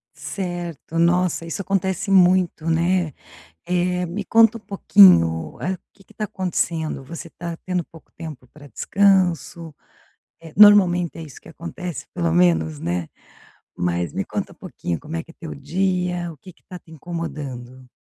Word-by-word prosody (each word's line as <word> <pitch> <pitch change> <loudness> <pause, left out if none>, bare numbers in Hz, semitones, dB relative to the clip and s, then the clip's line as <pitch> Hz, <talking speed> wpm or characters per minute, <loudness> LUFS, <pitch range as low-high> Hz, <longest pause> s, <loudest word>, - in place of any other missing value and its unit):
Certo. 175 -4 -5
Nossa, 175 0 +2
isso 165 +4 -4
acontece 190 0 -1
muito, 180 -3 +3
né. 170 -1 +1 0.5
Eh, 180 0 0
me 195 +5 -4
conta 225 +1 +5
um 225 - -16
pouquinho, 85 - +5
hã, 185 - -1
o 185 - -6 0.2
que 195 - -21
que - - -20
tá 215 - -5
acontecendo? 170 -6 -2
Você 165 +4 -8
tá 170 -1 -6
tendo 180 -1 -1
pouco 165 - -18
tempo 155 -6 -9
pra 145 -1 -14
descanso? 175 - +1 0.7
Eh, 165 -2 -12
normalmente 185 -5 +6
é - - -7
isso 150 -5 -12
que - - -14
acontece, 170 +1 -7
pelo 85 -1 0
menos, 80 -3 +2
né. 85 0 -3 0.7
Mas 85 -2 -1
me - - -2
conta - - -4
um - - -25
pouquinho 85 -2 -5
como 160 +2 -6
é 165 - -4
que 165 - -15
é - - -25
teu 165 -3 -7
dia? 180 +2 -1
O - - -18
que 185 +6 -13
que - - -32
tá 180 - -10
te 165 - -24
incomodando? 140 -7 -7
170 Hz, 165 wpm, -22 LUFS, 145-180 Hz, 0.7 s, normalmente